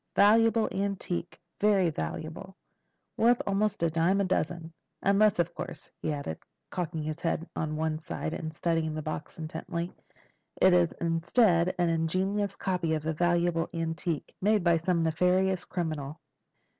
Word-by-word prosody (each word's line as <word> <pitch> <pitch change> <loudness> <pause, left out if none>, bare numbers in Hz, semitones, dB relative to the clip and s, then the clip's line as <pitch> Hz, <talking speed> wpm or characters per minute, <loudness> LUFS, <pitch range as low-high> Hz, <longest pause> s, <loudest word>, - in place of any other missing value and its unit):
"Valuable 225 +2 +5
antique—very 195 0 -1
valuable. 155 - -5 0.6
Worth 240 +2 +4
almost 200 -1 0
a 165 - +3
dime 170 +5 +2
a - - +3
dozen. 170 -3 -1 0.3
Unless, 200 +1 +4
of 170 0 0
course," 180 +1 -8
he - - -1
added, 140 - -4 0.3
cocking 165 -3 -3
his 155 +1 -4
head 165 0 -1
on 155 -1 -2
one 155 0 -1
side 160 0 -4
and 160 -2 -4
studying 160 -1 -1
the 155 - -4
box 155 0 -5
intently, 165 +2 -4 0.7
"it 185 -1 +6
is 175 -2 +4
instead 170 +2 +2
an 175 -1 +2
ingenious 190 +5 0
copy 180 -4 0
of 155 0 -4
a 160 - 0
valuable 175 0 +1
antique, 165 -1 -3
made 210 0 +3
by 170 -1 +4
some 170 0 +1
nefarious 180 +3 +2
criminal." 155 -4 -4
170 Hz, 145 wpm, -29 LUFS, 160-190 Hz, 0.7 s, it